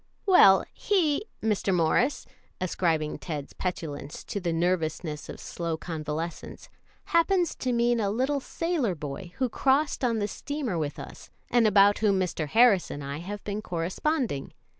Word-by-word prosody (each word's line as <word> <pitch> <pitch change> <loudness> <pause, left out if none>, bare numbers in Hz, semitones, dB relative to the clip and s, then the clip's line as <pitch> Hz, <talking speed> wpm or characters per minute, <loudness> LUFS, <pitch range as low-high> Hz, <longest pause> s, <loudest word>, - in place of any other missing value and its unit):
"Well, 195 - +7
he, 370 -1 +1 0.2
Mr. 210 -3 +1
Morris," 180 - +2 0.3
ascribing 165 -4 0
Ted's 150 -4 -6
petulance 150 -5 -5
to 200 - -4
the 175 -3 -2
nervousness 165 -2 -1
of - - -7
slow 170 -2 -4
convalescence, 160 0 -5 0.4
"happens 345 +1 +2
to 255 - -1
mean 235 0 +2
a 205 -2 +1
little 260 +7 0
sailor 295 - -1
boy 155 +4 -7
who 260 - 0
crossed 275 +5 +1
on 235 -2 +2
the 205 -1 0
steamer 265 - -3
with 150 -2 -3
us, - - -10 0.2
and 240 -2 +4
about 205 0 +5
whom 200 -3 +2
Mr. 175 -4 -2
Harris 220 0 +4
and 145 - -6
I 140 +1 -4
have 200 +4 -6
been 205 +1 -3
corresponding. 185 - -2
195 Hz, 150 wpm, -27 LUFS, 165-250 Hz, 0.4 s, Well